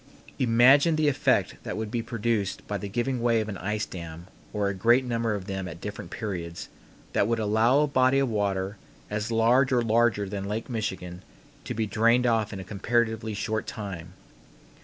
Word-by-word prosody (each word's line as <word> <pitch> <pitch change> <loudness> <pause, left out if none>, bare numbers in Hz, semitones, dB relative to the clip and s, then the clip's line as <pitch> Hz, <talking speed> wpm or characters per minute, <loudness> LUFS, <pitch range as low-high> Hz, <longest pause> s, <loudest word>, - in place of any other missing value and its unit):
Imagine 130 +6 +5
the 155 -1 +2
effect 145 - +1
that - - -5
would 110 -1 -4
be 120 -1 -1
produced 115 -4 -2
by 105 -1 -2
the 100 - -5
giving 120 +3 -1
way 115 -1 +3
of 110 - -2
an 100 - -5
ice 105 +2 -2
dam 85 -1 -8 0.3
or 105 -2 0
a 100 - -1
great 120 +7 +3
number 115 -3 -1
of 95 -2 -6
them 95 -2 -4
at 85 -1 -8
different 105 +3 -7
periods, 85 -6 -5 0.4
that 100 - +2
would 115 0 +1
allow 110 +6 +3
a - - +4
body 130 -1 +3
of 135 -1 +2
water 100 -2 -1 0.3
as 105 +2 -2
large 120 +4 +3
or 125 -2 +3
larger 115 -2 +2
than 100 0 -4
Lake 110 +4 -4
Michigan 95 -5 -4 0.4
to - - -4
be 110 0 0
drained 115 +4 +3
off 115 -3 +1
in 100 - -6
a - - -6
comparatively 110 +2 -1
short 110 +1 -2
time. 90 -5 -6
110 Hz, 190 wpm, -27 LUFS, 100-120 Hz, 0.4 s, Imagine